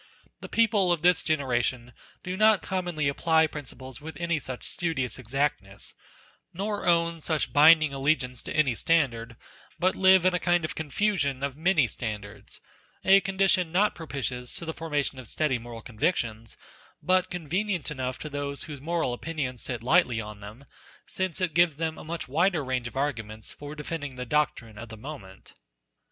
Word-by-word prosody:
The - - -9
people 210 -5 +3
of 170 -2 0
this 180 0 +4
genera 135 -6 +1
tion 120 0 -3 0.3
do 180 +1 -3
not 215 0 +4
commonly 175 -6 -1
apply 160 +3 +3
principles 135 -3 -8
with 160 +2 -8
any 170 -2 0
such 130 -3 -7
studious 140 - -2
exactness, 125 -5 -2 0.6
nor 205 +1 -3
own 170 -1 +3
such 155 -1 -1
binding 155 0 +7
allegiance 135 -3 0
to - - -8
any 150 -5 +3
standard, 120 -5 +1 0.4
but 185 +1 +2
live 190 -1 +6
in 185 - +4
a 180 - +1
kind 175 -2 +2
of - - -4
confusion 150 -4 -1
of 140 -2 -2
many 160 -2 +3
standards; 105 -3 -6 0.4
a 195 +1 +7
condition 190 -3 +2
not 200 +5 +3
propitious 130 -6 -4
to 170 - -5
the 160 - -3
formation 145 -5 -2
of 125 - -9
steady 140 -2 0
moral 115 -1 -9
convictions, 115 -3 -2 0.5
but 185 0 +2
convenient 180 +1 -2
enough 130 -2 -3
to - - -7
those 145 -1 -4
whose 145 -3 -8
moral 165 -4 -1
opinions 130 -3 -4
sit 120 -3 -4
lightly 120 -1 +3
on 105 -1 -7
them, 105 +7 -11 0.4
since 185 -3 -2
it 180 -4 0
gives 170 -2 +4
them 160 0 -2
a - - -9
much 165 +1 -5
wider 165 +3 +2
range 130 -2 -1
of 120 - -9
arguments 110 -6 -3
for 145 +1 -9
defending 150 -2 -5
the 125 0 -5
doctrine 115 -6 -1
of 115 +1 -8
the 110 - -9
moment. 105 -7 -10
150 Hz, 170 wpm, -27 LUFS, 125-170 Hz, 0.6 s, binding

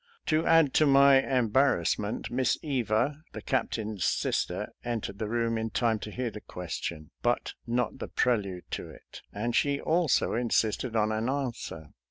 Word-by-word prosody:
To 155 0 +2
add 165 -4 +5
to 155 - +4
my 140 -1 +7
em 125 -5 0
barrassment. 110 -5 +1
Miss 125 0 +1
Eva, 140 +1 0
the - - -6
Captain's 110 - -2
sister, - - -1
en 120 -2 -2
tered 100 0 -7
the 110 - -2
room 115 0 0
in 110 0 -2
time 115 -1 +1
to 105 - -6
hear 120 +2 -3
the 105 0 -9
question, 80 -3 -6
but - - 0
not 120 0 -1
the - - -4
prelude 100 -7 0
to - - -4
it, - - -13
and 120 +3 -2
she 140 -1 +2
also 165 -2 +2
insisted 115 0 0
on 110 -1 +2
an 110 +3 -1
answer. 120 - -4
120 Hz, 170 wpm, -28 LUFS, 110-135 Hz, -, my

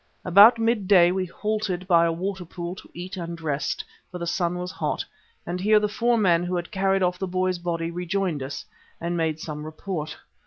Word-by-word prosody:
About 200 +6 +8
midday 205 -6 +4
we 185 0 -1
halted 210 -1 -2
by 170 -2 +5
a - - +1
water 185 +3 -3
pool 175 +1 -6
to 190 - -13
eat 185 +3 -7
and 170 -1 -5
rest, 150 -3 -2 0.3
for 180 - -7
the 170 - -4
sun 175 0 -1
was 180 0 -4
hot, - - -2 0.4
and 180 +1 -3
here 210 +3 +4
the 210 - +1
four 235 +3 +1
men 175 -5 +3
who 180 +1 -2
had 175 0 -4
carried 195 -1 +1
off 180 0 0
the 190 - -2
boy's 185 0 0
body 170 -1 -2
rejoined 180 -2 -2
us 135 +2 -5 0.3
and 170 +1 -2
made 160 -2 0
some 150 -1 -6
report. 155 0 -5
180 Hz, 200 wpm, -25 LUFS, 170-195 Hz, 0.4 s, About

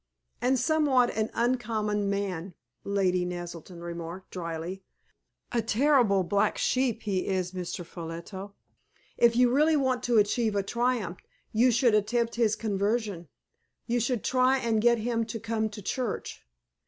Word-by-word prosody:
"And 255 +2 +2
somewhat 265 -3 +3
an 220 +1 0
uncommon 215 -4 0
man!" 190 -3 -3 0.3
Lady 185 -3 +1
Naselton 175 -1 -7
remarked, 170 +2 -7
dryly. 170 +1 -5 0.7
"A 235 - +1
terrible 230 -4 +3
black 200 +3 +1
sheep 255 -3 0
he 195 -3 -1
is, 185 -2 -1
Mr. 180 -1 -5
Ffolliot. 170 +5 -7 0.7
If 235 -1 +5
you 245 0 +4
really 305 +3 +4
want 260 -3 +1
to 240 -1 +3
achieve 215 +1 +2
a 200 - +1
triumph 235 -4 -1 0.3
you 235 +4 +4
should 240 -1 +3
attempt 230 +3 +1
his 225 -2 +2
conversion. 205 -3 -1 0.6
You 240 +1 0
should 240 -1 -1
try 260 +1 +3
and 230 -4 0
get 235 +1 +4
him 230 +1 -1
to 225 0 -5
come 220 0 -1
to 210 -1 -9
church. 245 +2 -3
215 Hz, 140 wpm, -28 LUFS, 190-240 Hz, 0.7 s, If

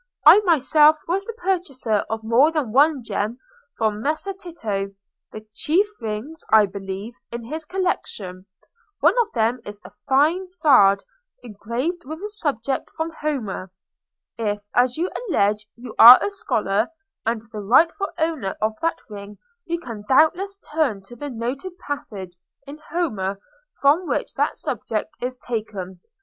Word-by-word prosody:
I - - +10
myself 310 -4 +4
was 380 +4 -1
the 460 - -5
purchaser 345 - -1
of 220 0 -3
more 240 +8 +4
than 300 -8 -2
one 280 +1 +4
gem 220 +1 -2 0.4
from 215 -2 0
Messer 310 - -2
Tito—the 215 - -7
chief 330 - +2 0.2
rings, 225 +9 -5
I 220 -1 +7
believe, 195 +3 -6 0.2
in 235 0 -5
his 310 +7 -5
collection. 200 - -3 0.5
One - - +5
of 460 - -3
them 230 +1 +1
is 205 0 -9
a - - -11 0.2
fine 310 +8 +3
sard, 255 - +4 0.4
engraved 245 - -4
with 315 +3 -7
a 420 - -3
subject 275 - -2
from 320 +1 -2
Homer. 230 -11 -3 0.7
If, 205 -2 -2
as 245 +2 +2
you 350 +3 -1 0.2
allege, 210 - +1
you 235 -2 -10
are 245 +3 +12
a 410 - -2
scholar, 215 - 0 0.4
and 225 -1 -1
the 215 - -6
rightful 330 - +3
owner 315 - -1
of 215 +1 0
that 330 0 0
ring, 205 -1 -9 0.3
you 340 0 -2
can 230 -9 -8
doubtless 355 +8 +3 0.2
turn 265 -11 0
to 240 +5 -13
the 290 +4 -6
noted 270 +9 -5
passage 210 - -6 0.3
in 290 +2 -10
Homer 210 - -2 0.4
from 305 +6 +3
which - - -2
that - - 0
subject - - -4
is 255 +1 -3
taken. 210 -7 -5
250 Hz, 145 wpm, -22 LUFS, 210-320 Hz, 0.7 s, are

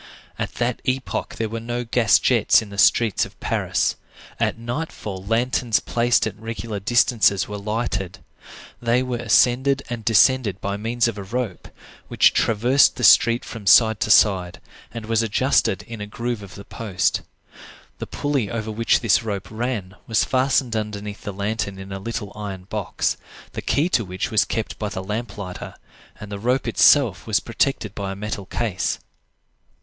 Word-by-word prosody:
At - - -4
that 120 0 -1
epoch 130 0 -2
there 110 - -2
were 115 +1 -5
no 120 +2 -4
gas 115 -1 +3
jets 115 -2 +3
in 105 - -12
the 100 - -6
streets 105 +3 +4
of - - -8
Paris. - - 0 0.4
At - - 0
nightfall 115 -6 -5
lanterns 115 +2 +1
placed 120 0 +1
at - - -4
regular 115 -1 -5
distances 105 -3 +2
were 105 0 -6
lighted; 100 -3 -3 0.6
they 120 +1 +2
were 125 -1 -3
ascended 130 +4 +3
and 120 -2 -4
descended 115 -2 +3
by 100 0 -3
means 115 +3 0
of 110 -3 -4
a - - -5
rope, 115 -1 -4 0.4
which - - +4
traversed 120 +6 +3
the 125 - -6
street 115 +6 +5
from 110 -4 -8
side 110 -1 +6
to - - -1
side, 95 -4 +4 0.3
and 115 -2 -7
was 115 0 +1
adjusted 115 -2 +1
in 115 0 -9
a 105 - -5
groove 115 +1 -4
of 100 -2 -11
the 100 - -10
post. 100 -5 -1 0.8
The - - -5
pulley 140 -8 -1
over 110 -1 -4
which 115 +2 +1
this 115 -4 +3
rope 100 -4 -5
ran 110 -5 -3
was 115 - +2
fastened 130 -2 +1
underneath 105 -1 -4
the 100 - -5
lantern 100 0 -3
in 95 0 -9
a 95 - -5
little 105 0 -5
iron 100 -3 -6
box, 105 +1 -2 0.3
the - - -5
key 150 +4 +1
to 120 - +1
which 95 -1 -4
was 110 - +3
kept 110 - -4
by 105 - -2
the 95 -2 -5
lamp 105 +2 -5
lighter, 90 -3 -7 0.4
and 105 0 -9
the 100 - -5
rope 125 +5 0
itself 115 - +4
was 110 -2 +2
protected 115 -2 -1
by 100 -2 -4
a - - -5
metal 100 -1 -5
case. 105 -3 -2
110 Hz, 175 wpm, -22 LUFS, 100-120 Hz, 0.8 s, side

